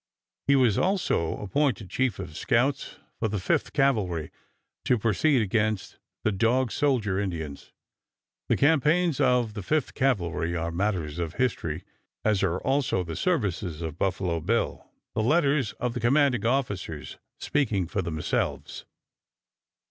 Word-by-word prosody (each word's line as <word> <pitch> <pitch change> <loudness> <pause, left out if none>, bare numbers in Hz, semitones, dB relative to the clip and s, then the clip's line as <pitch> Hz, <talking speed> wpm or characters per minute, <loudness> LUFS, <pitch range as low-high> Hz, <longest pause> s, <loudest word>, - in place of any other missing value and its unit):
He 140 - +5
was 125 -6 +3
also 185 - +1
appointed 115 - -1
chief 130 -4 0
of 90 -5 -7
scouts 130 - 0 0.2
for 110 - +1
the 105 0 -2
Fifth 95 - 0
Cavalry 105 - +1 0.5
to 125 - +3
proceed 115 +5 +2
against 110 0 -1 0.2
the 110 - +2
Dog 115 +5 +2
Soldier 115 -10 +1
Indians. 80 -8 -5 0.8
The - - +3
campaigns 160 +2 +3
of 125 -5 +2
the 105 - -5
Fifth 150 +8 0
Cavalry 85 -10 0
are 85 0 -2
matters 85 -4 -1
of 85 -1 -3
history, 90 -10 -1 0.4
as 105 -3 +2
are 90 -2 +1
also 135 -8 +1
the 85 -2 -6
services 95 - -1
of 80 0 -5
Buffalo 90 -3 0
Bill, 110 +9 -1 0.2
the - - 0
letters 140 -1 +2
of 125 -1 -3
the 125 - -3
commanding 120 -2 +3
officers 105 - -2 0.2
speaking 110 -10 0
for 95 +4 -2
themselves. 80 -3 -2
110 Hz, 135 wpm, -27 LUFS, 90-135 Hz, 0.8 s, He